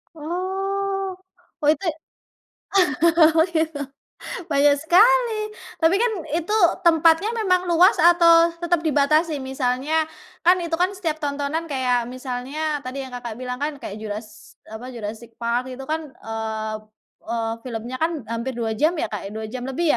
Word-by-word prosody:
Oh. 385 +3 -2 0.5
Oh, 295 - 0
itu 310 +5 +2 1.2
oh, 325 -1 +5 0.2
gitu. 315 -2 0 0.7
Banyak 285 -1 +4
sekali, 445 +9 +4 0.5
tapi 345 +5 +4
kan 475 0 +2 0.2
itu 340 +7 -1 0.3
tempatnya 330 +6 +4
memang 365 -5 +1
luas 350 +4 +5
atau 335 0 +6
tetep 345 0 +2
dibatasin? 305 0 +2
Misalnya 265 +4 0 0.4
kan, 360 +1 +7
itu 330 -1 -2
kan 370 +2 +1
setiap 330 -5 -3
tontonan 290 +2 -2
kayak 250 -4 0
misalnya 260 +4 -3
tadi 270 +2 -4
yang 260 - -8
Kakak 240 -2 -6
bilang 250 +1 -5
kan, 290 +2 -2
kayak 205 - -6
juras 215 +1 -8 0.2
apa, 245 +4 -8
Jurassic 225 +1 -7
Park 240 +2 -2
itu 270 - -8
kan, 315 -3 -3
eee 220 -1 -4 0.5
eee, 225 0 -2
filmnya 240 +2 -5
kan 320 -2 -1
hampir 235 +3 -3
2 230 -2 -2
jam 315 +6 +3
ya, 310 - -1
Kak, 210 -2 -5
ya. - - -7
2 220 0 -4
jam 250 +1 -5
lebih 300 +4 0
295 Hz, 145 wpm, -23 LUFS, 245-335 Hz, 1.2 s, kan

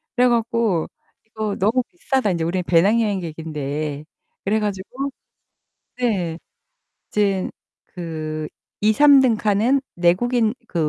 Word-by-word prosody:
그래 250 0 +4
갖고 230 -7 +1 0.4
"이거 220 -2 -3
너무 225 +6 +2
비싸다. 265 - 0
인제 170 -2 -1
우리는 180 +2 -1
배낭여행객인데." 160 -7 0 0.4
그래 215 +3 +1
가지고 210 +7 -3 0.9
네. 190 -10 -1 0.7
이젠 200 -3 0 0.4
그 155 -3 -5 0.3
2-3 275 +7 +6
등 250 -4 +4
칸은 220 +6 +2
내국인 220 +7 +2
그 160 -4 0
205 Hz, 215 characters per minute, -21 LUFS, 170-235 Hz, 0.9 s, 2-3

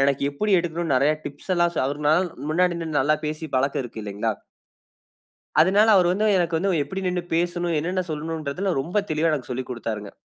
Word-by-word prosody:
எனக்கு 140 0 +2
எப்படி 210 +10 -2
எடுக்கணும்னு 165 -3 -2
நிறைய 145 +4 +3
டிப்ஸ் 145 +6 -5
எல்லாம் 175 0 +2
சொ - - 0
அவரு 145 +1 -3
"நான் 175 +2 +2 0.2
முன்னாடி 180 +2 +2
நின்னு 155 -3 -1
நல்லா 150 +3 +3
பேசி 155 +1 -4
பழக்கம் 135 +1 +1
இருக்கு 115 -2 -8
இல்லைங்களா?" 105 +1 -2 1.2
அதனால 200 +6 +5
அவர் 180 -2 +4
வந்து 210 +3 +1
எனக்கு 170 -2 +1
வந்து 195 +3 0
எப்படி 190 +7 -5
நின்னு 180 -1 -1
பேசணும், 175 0 0
என்னென்ன 180 +3 -1
சொல்லணும்ன்றதில 160 +4 -2
ரொம்ப 180 +8 -1
தெளிவா 155 +1 +2
எனக்கு 135 -3 -3
சொல்லிக் 130 +1 -5
குடுத்தாருங்க. 110 -4 -4
160 Hz, 180 wpm, -24 LUFS, 140-175 Hz, 1.2 s, அதனால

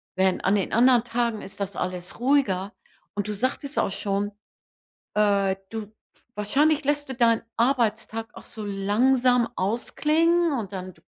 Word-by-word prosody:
Wenn 190 0 +2
an 195 +2 +2
den 195 - -1
anderen 245 0 +5
Tagen 235 -2 -1
ist 195 - -11
das 195 -1 -3
alles 180 +1 -4
ruhiger 230 -7 +1 0.4
und 205 0 -2
du - - -1
sagtest 260 +6 -2
auch - - +1
schon, 200 +1 -1 0.8
äh, 200 -2 +2
du 215 -2 -6 0.4
Wahrscheinlich 290 +9 +2
lässt 290 0 0
du 265 - -4
deinen 230 -2 +3
Arbeitstag 225 -3 0
auch - - -11
so 215 - -7
langsam 240 +5 +2
ausklingen 310 - +1
und 205 -3 -5
dann 185 -1 -6
225 Hz, 145 wpm, -25 LUFS, 200-255 Hz, 0.8 s, anderen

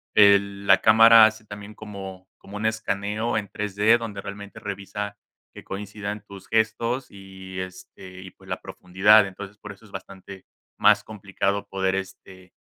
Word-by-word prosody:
eh, 100 -1 +7
la 100 -1 +1
cámara 115 +1 +8
hace 110 0 -2
también 105 0 -10
como 95 -3 -9
como 100 +1 -10
un 105 - -4
escaneo 110 0 -1
en 105 -2 -3
3D, 105 +2 +2
donde 110 -4 -6
realmente 100 +1 -9
revisa 100 +1 -6 0.4
que - - -12
coincidan 105 +1 -6
tus 100 -1 -12
gestos 115 +3 0
y, 95 -1 -10
este, 95 0 -11
y, 95 - -11
pues, - - -19
la - - -3
profundidad. 100 +4 +3
Entonces, 100 +1 -10
por 105 - -9
eso 100 +3 -15
es 105 - -18
bastante 95 0 -10 0.3
más - - +4
complicado 100 -1 -3
poder, 95 -1 -1
este 95 -1 -8
100 Hz, 155 wpm, -24 LUFS, 95-105 Hz, 0.4 s, cámara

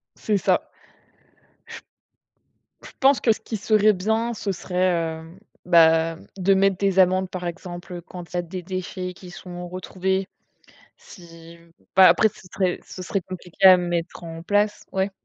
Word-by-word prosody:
C'est 210 -2 0
ça. - - 0 2.1
J - - -11
je - - -20
pense 270 0 +4
que 225 - +4
ce - - -6
qui 225 - -5
serait 215 +1 +3
bien, 220 +5 -1
ce 205 -2 -3
serait, 175 -3 -1
heu 165 +3 -15 0.3
bah, 165 -1 +4 0.2
de 195 +1 +3
mettre 195 0 +3
des 195 0 0
amendes, 185 0 +3
par 180 -1 -6
exemple, 175 0 -7
quand 175 0 -11
il - - -15
y - - +1
a - - 0
des 180 +2 -7
déchets 185 0 -5
qui 180 0 -12
sont 175 -1 -9
retrouvés, 190 +1 -2 0.7
si 165 -2 -15 0.4
bah, 190 0 +8
après 220 - +4
ce 215 - -17
serait 185 -2 -1
ce 185 - -9
serait 195 +2 -2
compliqué 185 +1 -1
à 185 -1 +10
mettre 175 -1 -3
en 165 0 -8
place, 205 +3 0
ouais. 190 +1 0
185 Hz, 165 wpm, -23 LUFS, 175-195 Hz, 2.1 s, à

